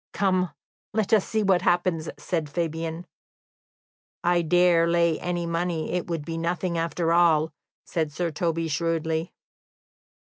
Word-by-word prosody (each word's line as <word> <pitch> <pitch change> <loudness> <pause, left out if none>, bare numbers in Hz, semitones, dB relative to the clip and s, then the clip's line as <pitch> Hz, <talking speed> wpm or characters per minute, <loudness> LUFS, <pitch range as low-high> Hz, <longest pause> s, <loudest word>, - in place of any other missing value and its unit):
"Come, 185 -2 +1 0.5
let 220 -1 +1
us 210 -3 +4
see 220 -1 0
what 190 -3 +3
happens," 175 -2 +1
said 160 -4 -2
Fabian. 165 +1 -3 1.2
"I 175 0 +3
dare 170 0 +4
lay 170 -1 +2
any 175 -1 -2
money, 170 -1 -2
it 180 -1 -2
will 170 -1 -1
be 165 +2 -5
nothing, 170 +1 -1
after 165 0 0
all," 160 -2 +4 0.3
said 160 -3 -1
Sir 170 +2 -2
Toby 165 +1 -1
shrewdly. 160 +1 -1
170 Hz, 135 wpm, -25 LUFS, 165-175 Hz, 1.2 s, us